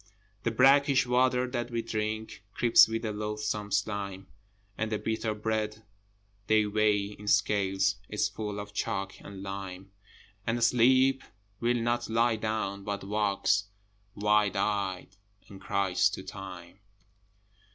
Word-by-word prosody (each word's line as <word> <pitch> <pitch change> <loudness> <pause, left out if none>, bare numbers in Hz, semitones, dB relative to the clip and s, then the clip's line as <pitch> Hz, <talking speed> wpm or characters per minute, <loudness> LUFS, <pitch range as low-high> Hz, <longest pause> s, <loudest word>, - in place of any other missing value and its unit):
The 115 - 0
brackish 135 +3 +5
water 125 0 +2
that 120 -1 -3
we 115 -1 -2
drink 110 -2 -4
Creeps 120 -1 +6
with 115 +1 -3
a 110 - -1
loathsome 105 0 -3
slime, 100 -1 -2 0.5
And 110 +2 -3
the 105 - 0
bitter 110 0 -2
bread 110 0 -2 0.6
they 110 -1 +4
weigh 105 -1 +1
in 105 0 -11
scales 95 -2 +2
Is 105 0 0
full 105 -1 -5
of 105 0 -8
chalk 95 -1 -3
and 100 -1 -9
lime, 95 -1 -7 0.6
And 115 +1 0
Sleep 130 +3 +4 0.4
will 120 +1 +1
not 120 0 -1
lie 115 +1 +2
down, 110 -2 -3
but 100 0 -4
walks 100 0 +1 0.5
Wild 105 -1 +2
eyed 95 -2 -2 0.3
and 95 -1 -12
cries 95 -2 +1
to - - -7
Time. 90 -1 -9
105 Hz, 130 wpm, -29 LUFS, 100-115 Hz, 0.6 s, Creeps